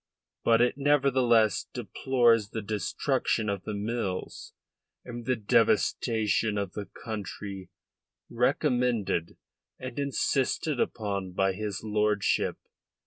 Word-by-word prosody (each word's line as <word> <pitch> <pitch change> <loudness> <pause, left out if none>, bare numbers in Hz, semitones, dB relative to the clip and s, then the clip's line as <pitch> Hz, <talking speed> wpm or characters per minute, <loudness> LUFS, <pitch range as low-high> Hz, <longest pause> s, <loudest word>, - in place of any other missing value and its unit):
But 115 0 +4
it 125 +3 +2
nevertheless 130 -6 +3
deplores 120 -5 +2
the 110 -1 -5
destruction 105 +1 -1
of 100 -2 -3
the 105 - -3
mills 100 -3 -4 0.5
and 120 -1 -8
the 130 - +2
devastation 110 0 +2
of 100 -2 -2
the 105 -1 -6
country 100 -3 -7 0.6
recommended 125 - 0 0.4
and 130 +1 -6
insisted 140 0 0
upon 100 -4 -2
by 95 +1 +1
his 105 -1 -4
lordship. 105 -2 +1
110 Hz, 100 wpm, -28 LUFS, 100-125 Hz, 0.6 s, But